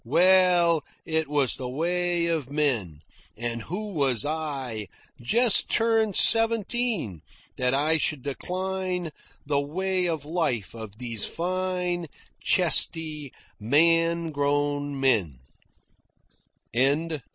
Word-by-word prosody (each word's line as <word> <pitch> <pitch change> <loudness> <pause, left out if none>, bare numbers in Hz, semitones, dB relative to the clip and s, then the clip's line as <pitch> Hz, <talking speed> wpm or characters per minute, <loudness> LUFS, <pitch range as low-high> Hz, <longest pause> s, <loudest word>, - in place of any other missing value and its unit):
Well, 175 +2 +3 0.2
it 160 -1 -1
was 145 -3 +1
the 125 -1 -5
way 175 +4 -1
of 160 -6 -2
men, 120 - -1 0.4
and 120 0 -4
who 200 - -6
was 135 - +1
I, 140 -8 -4 0.3
just 230 - +3
turned 225 -3 +2
seventeen, 225 - +2 0.4
that 125 +1 +1
I 155 +3 +3
should 150 -3 -1
decline 180 +3 -3 0.3
the 140 -1 0
way 185 +5 -2
of 160 -4 -3
life 150 - -2
of 110 -2 -9
these 115 -3 -3
fine, 180 -1 -2 0.3
chesty, 155 -4 +2 0.3
man 165 +7 +2
grown 145 0 -1
men? 110 - +1
155 Hz, 100 wpm, -25 LUFS, 135-180 Hz, 0.4 s, Well